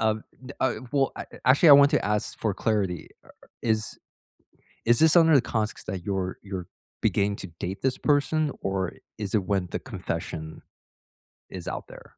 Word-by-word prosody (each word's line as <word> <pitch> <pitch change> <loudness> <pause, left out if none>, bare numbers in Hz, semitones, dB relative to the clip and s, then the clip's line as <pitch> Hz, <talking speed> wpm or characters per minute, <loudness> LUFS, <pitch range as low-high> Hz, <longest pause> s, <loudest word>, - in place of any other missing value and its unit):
Uh, 110 -1 +3 0.3
d 135 - -7
uh, 130 - +2 0.2
well, 135 -1 +2
a - - -6 0.2
actually, 140 +6 +6
I - - +11
want 140 +1 +8
to 150 - +1
ask 105 0 -1
for 105 -4 -1
clarity, 100 -6 -1 0.5
is 110 -2 -1 0.9
is 120 0 +4
this 160 +1 +5
under 165 -2 +7
the 135 - +6
context 110 -5 -3
that 90 -2 -4
you're 95 -2 -2
you're 95 -3 -6 0.3
beginning 100 0 +1
to - - -6
date 95 +2 -4
this 130 -1 +1
person 150 +1 +1
or 95 -3 -1 0.2
is 105 -1 -2
it 105 - +2
when 95 -3 0
the - - -2
confession 80 0 -5 0.9
is 90 -3 -7
out - - -4
there. - - -13
105 Hz, 170 wpm, -26 LUFS, 95-135 Hz, 0.9 s, I